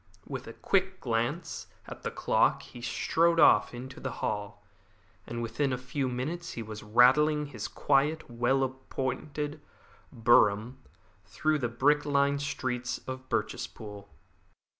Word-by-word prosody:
With - - -6
a - - -7
quick 190 -1 0
glance 120 +7 -2 0.2
at - - -9
the - - -2
clock - - +2
he 120 - -11
strode 165 +8 +2
off - - +6
into 130 +2 -8
the 130 - -4
hall, 105 0 -4 0.6
and 120 0 -4
within 130 +5 -1
a 125 - 0
few 130 +1 -2
minutes 155 +8 -4
he 115 - -5
was 110 -1 -8
rattling 130 +8 +5
in - - -3
his 110 -5 -5
quiet, 145 +3 +1
well 120 +3 +1
appointed 135 +3 -4 0.5
brougham 115 0 +3 0.5
through 155 -1 0
the 120 -3 -1
brick 145 +5 +3
lined 140 -1 +2
streets 125 -4 -2
of 130 0 -6
Birchespool. 105 -2 -4
130 Hz, 140 wpm, -29 LUFS, 120-145 Hz, 0.6 s, off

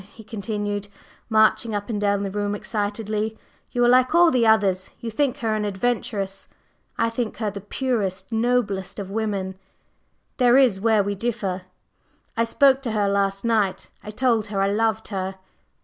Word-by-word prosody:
he 225 - -12
continued, 205 -1 -3 0.4
marching 220 0 +3
up 205 0 -3
and 210 -3 -3
down 200 -1 +1
the 195 - -3
room 205 0 -1
excitedly. 215 +1 -2 0.3
"You 245 0 +2
are - - +5
like 255 +4 +4
all 340 -1 +6
the 240 -4 +3
others; 195 -4 +3
you 230 - -5
think 270 +3 0
her 225 -2 -1
an 215 -1 -1
adventuress. 205 -1 -2 0.5
I 230 0 +1
think 230 -1 -3
her 215 -2 -1
the 200 0 -7
purest, 205 -4 -2
the 225 - 0
noblest 225 -5 0
of 195 -2 -6
women! 200 -3 -2 0.8
There 250 -1 +5
is 240 -8 +4
where 220 -2 +3
we 200 +1 -2
differ. 200 -4 -3 0.7
I 230 - +2
spoke 270 +2 +4
to 235 -5 -3
her 205 -2 +1
last 195 +1 0
night, 215 -5 0
I - - -8
told 225 0 +1
her 200 -1 -3
I 195 0 +2
loved 220 +1 0
her." 190 -2 -3
215 Hz, 175 wpm, -23 LUFS, 200-230 Hz, 0.8 s, all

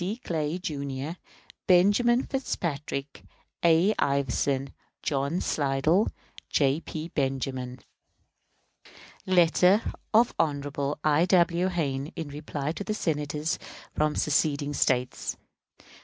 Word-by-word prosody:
CLAY, 160 0 -1
Jr., 140 -4 -4 0.6
BENJAMIN 205 +7 +4
FITZPATRICK, 150 - -3 0.4
A. 170 +5 +5
IVERSON, 140 -1 0 0.3
JOHN 140 +4 0
SLIDELL, 150 +7 +2 0.4
J. 140 +1 +2
P. 160 0 -6
BENJAMIN. 130 -3 -2 1.5
_Letter 185 +3 +4 0.2
of 230 +2 +4
Hon. 145 -2 -1
I. 155 +2 +4
W. 175 -1 +3
Hayne 145 -6 -1
in 160 -3 -5
reply 145 0 -4
to 205 +6 -3
Senators 150 -2 -1 0.3
from 150 0 +1
seceding 145 -1 +1
States. 125 -2 0
150 Hz, 90 wpm, -27 LUFS, 140-175 Hz, 1.5 s, A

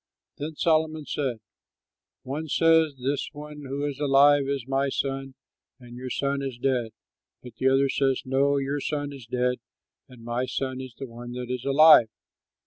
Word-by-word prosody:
Then 150 +2 -5
Solomon 155 -1 +1
said, 130 -7 -3 0.8
"One 150 +5 -4
says, 160 -1 +3
'This 135 +3 -2
one 150 0 -9
who 140 +2 -3
is 145 -1 -4
alive 140 0 +5
is 140 -3 -2
my 135 +1 0
son, 135 0 -3 0.4
and 120 -1 -12
your 130 +1 -6
son 140 +2 -1
is 135 -3 -5
dead.' 120 -3 -1 0.5
But 120 -2 -12
the 130 - +3
other 135 +1 +3
says, 135 -1 0
'No; 140 +2 +2
your 140 +1 -1
son 145 0 -3
is 130 -5 -11
dead, 125 0 0 0.5
and 125 -3 -14
my 120 +2 -2
son 130 0 -3
is 130 -3 -10
the 135 - -6
one 120 0 -9
that 125 0 -5
is 125 0 -4
alive.' 140 -4 +7
135 Hz, 170 wpm, -26 LUFS, 125-145 Hz, 0.8 s, alive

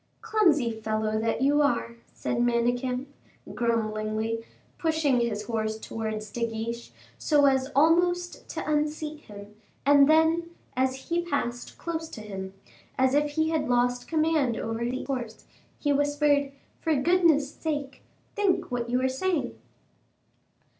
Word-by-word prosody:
"Clumsy 315 - +3
fellow 215 -1 -1
that 225 +3 0
you 290 +2 +4
are!" 235 -5 0
said 235 - -3
Manicamp, 245 +2 +1 0.5
grumblingly, 220 -1 -1 0.4
pushing 315 -6 +2
his 215 -3 -1
horse 220 0 -2
towards 220 -1 -5
De 235 +1 -1
Guiche, 230 +1 -5 0.3
so 295 -2 +4
as 265 -1 +3
almost 350 +4 +2
to - - -5
unseat 300 0 -1
him, 205 0 -11 0.3
and 285 0 +6
then, 320 +2 +3 0.3
as 260 +2 -1
he 340 +1 +1
passed 280 -8 -3
close 325 -1 -4
to 220 - -8
him, 195 -2 -7 0.4
as 260 0 +3
if 295 0 +2
he 315 +1 +1
had 315 -5 0
lost 245 0 +1
command 310 -7 +1
over 225 +1 -3
the 250 +2 -2
horse, 245 -5 -5 0.3
he 290 -1 +1
whispered, 290 0 +2 0.3
"For 320 -1 +1
goodness' 300 -1 +3
sake, 290 -4 -4 0.3
think 400 -8 +1
what 240 -1 -2
you 250 +1 +1
are - - +4
saying." 325 +6 -1
265 Hz, 135 wpm, -27 LUFS, 230-305 Hz, 0.5 s, and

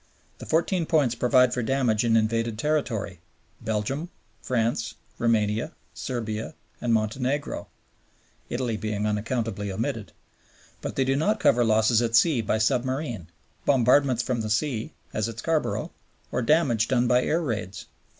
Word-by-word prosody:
The - - -9
Fourteen 170 +1 +1
Points 145 -8 +3
provide 125 +1 +3
for 125 - -1
damage 120 -3 +1
in 115 -1 +3
invaded 115 0 0
territory 115 - -1 0.4
Belgium, 115 +9 -2 0.3
France, 115 -2 -1 0.2
Roumania, 115 +4 +1 0.2
Serbia, 110 -4 -4 0.3
and 120 - 0
Montenegro 125 +6 -1 0.8
(Italy 120 -3 -1
being 105 -1 -2
unaccountably 105 -1 -2
omitted) 95 - -3 0.7
but - - -5
they 135 - +2
do 135 +1 +2
not 185 +10 +1
cover 120 +1 +4
losses 110 +1 +3
at 115 -1 0
sea 135 -1 +4
by 110 0 0
submarine, 120 - -1 0.4
bombardments 130 -1 +3
from 120 -2 -1
the 110 - -3
sea 110 +1 -1 0.2
(as 110 +1 -1
at 115 - -8
Scarborough), 155 +6 -1 0.4
or - - 0
damage 120 -5 +3
done 125 -2 +2
by 125 +1 +4
air 165 - +1
raids. 105 - -4
120 Hz, 140 wpm, -26 LUFS, 110-135 Hz, 0.8 s, cover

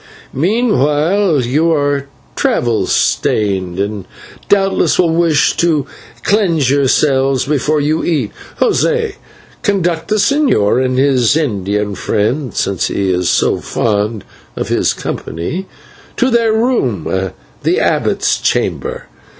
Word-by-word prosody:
Meanwhile, 165 - +1
you 155 +7 +1
are 145 -2 0 0.3
travel 120 -2 0
stained 95 -4 0
and 100 -1 -3 0.4
doubtless 195 -1 +2
will 170 -3 +2
wish 165 -3 +2
to 160 -5 +1 0.4
cleanse 170 - +2
yourself 135 -1 +2
before 150 +1 +1
you 150 +2 0
eat. 145 -11 -1 0.3
José, 460 -4 +1 0.4
conduct 175 -5 0
the 215 - 0
señor 210 - +2
and 130 0 -1
his 135 -1 +3
Indian 105 - -1
friend, 115 +7 -1
since 100 -2 0
he 95 -1 -1
is 90 -1 0
so - - +2
fond 105 -1 -1 0.3
of - - -4
his - - +1
company, 160 - -5 0.5
to 255 0 +2
their 230 -1 +3
room, 120 - 0 0.3
the - - +1
abbot's - - +1
chamber. - - -2
145 Hz, 115 wpm, -15 LUFS, 110-175 Hz, 0.5 s, his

